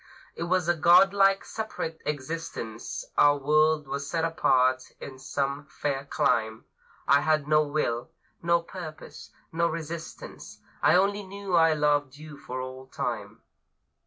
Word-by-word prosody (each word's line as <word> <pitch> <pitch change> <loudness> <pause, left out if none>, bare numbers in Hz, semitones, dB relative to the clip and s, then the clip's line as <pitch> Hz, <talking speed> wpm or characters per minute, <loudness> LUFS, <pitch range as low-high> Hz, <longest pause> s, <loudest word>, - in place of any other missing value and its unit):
It 170 - -4
was 180 -1 +1
a 175 - +4
godlike 195 +4 +5
separate 215 -7 -5
existence; 145 -6 -5
Our 145 0 +6
world 150 +1 +2
was 140 +1 -4
set 165 -1 0
apart 130 -5 +2
in 130 -1 -9
some 140 +1 -3
fair 140 -1 -3
clime. 110 -5 0 0.4
I 140 0 +5
had 155 -2 +1
no 155 0 +4
will, 145 -5 -2 0.3
no 170 0 +2
purpose, 170 -3 -9 0.2
no 170 +1 +1
resistance; 160 0 -7 0.2
I - - +5
only 200 +3 +2
knew 200 -1 -7
I 165 -1 +5
loved 145 -2 +1
you 155 0 -10
for 130 -2 -7
all 130 0 -8
time. - - -5
155 Hz, 135 wpm, -27 LUFS, 140-170 Hz, 0.4 s, Our